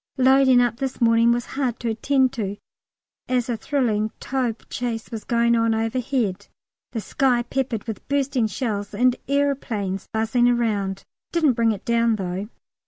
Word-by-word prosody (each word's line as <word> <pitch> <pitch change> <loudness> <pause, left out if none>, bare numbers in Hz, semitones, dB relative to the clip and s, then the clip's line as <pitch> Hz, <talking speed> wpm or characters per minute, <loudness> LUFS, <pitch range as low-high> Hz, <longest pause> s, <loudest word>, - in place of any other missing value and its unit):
Loading 260 -1 +5
up 240 -2 +1
this 265 0 -3
morning 230 0 +4
was 240 0 0
hard 260 -4 -2
to 235 - -1
attend 260 +3 +1
to, 205 -4 -3 0.7
as 250 0 0
a 240 - 0
thrilling 225 -5 0
Taube 250 -4 -2
chase 235 -2 -4
was 225 -2 -5
going 235 0 +2
on 230 -1 +2
overhead, 225 -3 -1 0.4
the 230 - -3
sky 245 +3 +1
peppered 240 -3 -2
with 225 -3 -7
bursting 275 -4 +1
shells, 205 -1 -3
and 250 +3 +3
aeroplanes 255 -9 -1
buzzing 225 +2 +2
around: 210 -5 0 0.3
didn't 315 -6 +3
bring 230 -1 +2
it 205 - -6
down 235 -1 +2
though. 190 +1 -4
235 Hz, 155 wpm, -23 LUFS, 220-255 Hz, 0.7 s, Loading